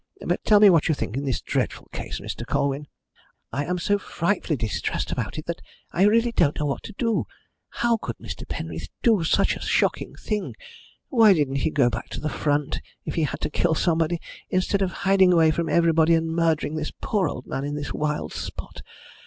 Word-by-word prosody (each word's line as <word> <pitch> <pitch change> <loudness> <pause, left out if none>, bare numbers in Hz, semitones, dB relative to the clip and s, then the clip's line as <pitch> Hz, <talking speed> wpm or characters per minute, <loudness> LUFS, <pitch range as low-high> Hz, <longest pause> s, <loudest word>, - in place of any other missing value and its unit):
But - - -1
tell 210 -1 +6
me 205 -2 +8
what 165 -4 +3
you 155 - +2
think 110 - -4
of 140 +2 -2
this 130 -5 -1
dreadful - - -2
case, - - -5
Mr. - - -6
Colwyn. 140 +1 -1 0.7
I 145 +2 -1
am 180 +3 -1
so 205 +3 +1
frightfully 175 -4 -1
distressed 110 -3 -2
about - - -3
it - - -5
that - - -4 0.3
I 190 - +3
really 230 +3 +4
don't 150 -10 +2
know 150 - 0
what 140 - -2
to 215 - -8
do. 230 -3 0 0.4
How 235 -1 +1
could 115 - -6
Mr. - - -8
Penreath 80 -1 -5 0.2
do 220 -7 +4
such 160 - +2
a - - -8
shocking - - 0
thing? 210 -2 -3 0.5
Why 225 -6 +6
didn't 145 -5 0
he 140 - +1
go 140 -5 +3
back 115 - -5
to - - -5
the 155 - -2
front, 145 -1 -1 0.2
if - - -3
he 160 - +1
had - - -5
to - - -2
kill 165 +2 +1
somebody, 165 0 +1 0.3
instead 185 +2 +1
of 190 -2 +1
hiding 190 -1 +4
away 160 -2 +5
from 165 +1 -1
everybody 165 -1 +4
and 165 0 0
murdering 165 -2 +1
this 155 -1 -3
poor 195 -7 +1
old 125 - -7
man 135 - -3
in 145 +1 -3
this 145 -1 -4
wild 150 0 -2
spot? - - -7
165 Hz, 205 wpm, -24 LUFS, 145-190 Hz, 0.7 s, me